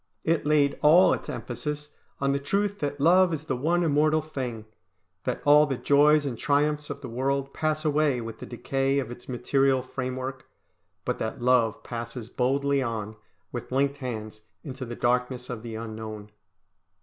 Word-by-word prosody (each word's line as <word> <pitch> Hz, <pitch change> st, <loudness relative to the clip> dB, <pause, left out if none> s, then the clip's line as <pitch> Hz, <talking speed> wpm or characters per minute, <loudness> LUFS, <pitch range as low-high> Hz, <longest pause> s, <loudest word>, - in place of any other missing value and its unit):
It 165 Hz, -2 st, +1 dB
laid 145 Hz, -2 st, +3 dB
all 165 Hz, +5 st, +6 dB
its -, -, -5 dB
emphasis 150 Hz, 0 st, -5 dB, 0.3 s
on 140 Hz, 0 st, +1 dB
the 140 Hz, -, 0 dB
truth 200 Hz, +8 st, -1 dB
that 145 Hz, -1 st, -3 dB
love 180 Hz, +4 st, +5 dB
is 155 Hz, -2 st, -3 dB
the 145 Hz, -4 st, -2 dB
one 170 Hz, +7 st, +1 dB
immortal 155 Hz, 0 st, +3 dB
thing, 125 Hz, -8 st, -5 dB, 0.6 s
that -, -, -2 dB
all 150 Hz, +1 st, +7 dB
the 135 Hz, -3 st, -2 dB
joys 145 Hz, +2 st, +4 dB
and 125 Hz, -5 st, -4 dB
triumphs 150 Hz, +1 st, +1 dB
of 140 Hz, -, -6 dB
the 135 Hz, -, -6 dB
world 135 Hz, +3 st, -1 dB
pass 155 Hz, 0 st, -1 dB
away 150 Hz, -3 st, +2 dB
with 115 Hz, -1 st, -7 dB
the -, -, -8 dB
decay 135 Hz, +3 st, -1 dB
of 130 Hz, -4 st, -2 dB
its 120 Hz, +1 st, -10 dB
material 130 Hz, +1 st, +2 dB
framework, 130 Hz, 0 st, -5 dB, 0.6 s
but -, -, -2 dB
that 110 Hz, -, -3 dB
love 120 Hz, -3 st, +2 dB
passes 115 Hz, -1 st, -6 dB
boldly 140 Hz, +2 st, +1 dB
on, 110 Hz, -4 st, -3 dB, 0.4 s
with 120 Hz, 0 st, -6 dB
linked 140 Hz, +2 st, +1 dB
hands, 110 Hz, -5 st, -6 dB, 0.2 s
into 130 Hz, -3 st, -6 dB
the 120 Hz, 0 st, -6 dB
darkness 125 Hz, +1 st, 0 dB
of 115 Hz, -3 st, -5 dB
the 115 Hz, -1 st, -7 dB
unknown. 110 Hz, -2 st, -7 dB
135 Hz, 170 wpm, -27 LUFS, 120-150 Hz, 0.6 s, all